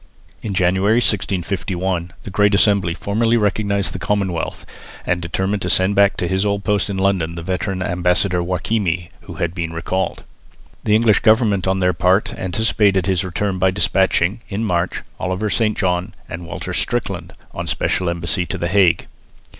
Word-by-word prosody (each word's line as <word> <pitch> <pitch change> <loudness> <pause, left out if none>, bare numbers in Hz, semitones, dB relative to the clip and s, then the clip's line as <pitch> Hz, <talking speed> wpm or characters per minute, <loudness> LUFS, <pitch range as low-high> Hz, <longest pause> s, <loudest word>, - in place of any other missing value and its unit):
In 100 -3 -4
January, 95 +4 +2
1651, 95 -4 -1
the 100 - -7
Great 105 +1 +3
Assembly 100 -4 +3
formally 115 +5 +1
recognised 100 -2 0
the 95 - -5
Commonwealth 95 -4 -2 0.4
and 90 -1 0
determined 95 +4 -1
to 90 - -2
send 95 +3 +3
back 100 0 +3
to 90 - -1
his 95 +2 0
old 100 -1 -1
post 105 -1 +1
in 100 - -3
London 95 -4 0
the 85 - -6
veteran 95 +1 -2
ambassador, 90 +1 +1
Joachimi, 90 -1 -1
who - - -9
had 85 0 -2
been 85 -3 -3
recalled. 95 +3 -2 0.6
The 105 - +4
English 110 -1 +4
government 110 -4 +3
on 95 0 +1
their 90 0 +3
part 90 +4 +2
anticipated 100 -1 +1
his 95 -2 +1
return 95 +1 -2
by 95 +1 +4
despatching, 95 +1 +1
in 105 +3 -2
March, 90 -2 -1 0.2
Oliver 95 +3 -2
St 110 -2 +1
John 90 -2 -1
and 85 +1 -7
Walter - - -5
Strickland - - -2 0.2
on - - -4
a - - -10
special 90 -2 0
embassy 85 +1 -2
to 95 - -3
the 85 -1 -2
Hague. 95 -3 +3
95 Hz, 170 wpm, -19 LUFS, 90-100 Hz, 0.6 s, The